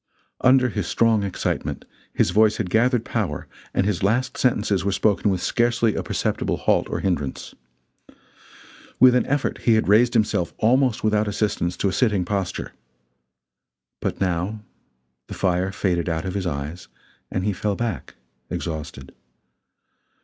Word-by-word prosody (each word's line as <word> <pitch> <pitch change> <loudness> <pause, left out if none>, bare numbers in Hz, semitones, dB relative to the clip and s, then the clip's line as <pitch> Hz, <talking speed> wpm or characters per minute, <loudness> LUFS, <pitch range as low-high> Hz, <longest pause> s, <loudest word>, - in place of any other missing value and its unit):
Under 130 0 +5
his 100 -5 -3
strong 115 -2 +2
excitement 100 -2 -3 0.3
his - - +1
voice 110 0 +4
had 90 - -3
gathered 120 +1 +2
power - - -3 0.2
and 95 - +1
his 100 -3 -1
last 115 +6 +1
sentences 105 -6 +1
were 100 - 0
spoken 105 +1 +1
with 95 -2 -1
scarcely 120 -2 +1
a - - -2
perceptible - - -1
halt - - +1
or - - -3
hindrance. 75 -8 -2 1.5
With 125 0 +7
an 125 - +2
effort 145 0 -1
he 115 - +3
had 110 - +1
raised 115 +5 +4
himself 105 -6 +1
almost 125 +1 +2
without 105 0 +2
assistance 100 -4 -1
to - - 0
a 95 - -1
sitting 105 -5 +1
posture. 95 -2 -3 1.3
But - - -3
now 95 +3 -1 0.6
the - - -7
fire 95 0 0
faded 90 -3 -1
out 80 -1 -2
of 95 - -3
his 95 -2 -2
eyes 75 +2 -5 0.4
and 95 - -2
he 105 - +1
fell 100 +2 -2
back 110 - -4 0.3
exhausted. 75 -4 -6
100 Hz, 150 wpm, -23 LUFS, 90-115 Hz, 1.5 s, With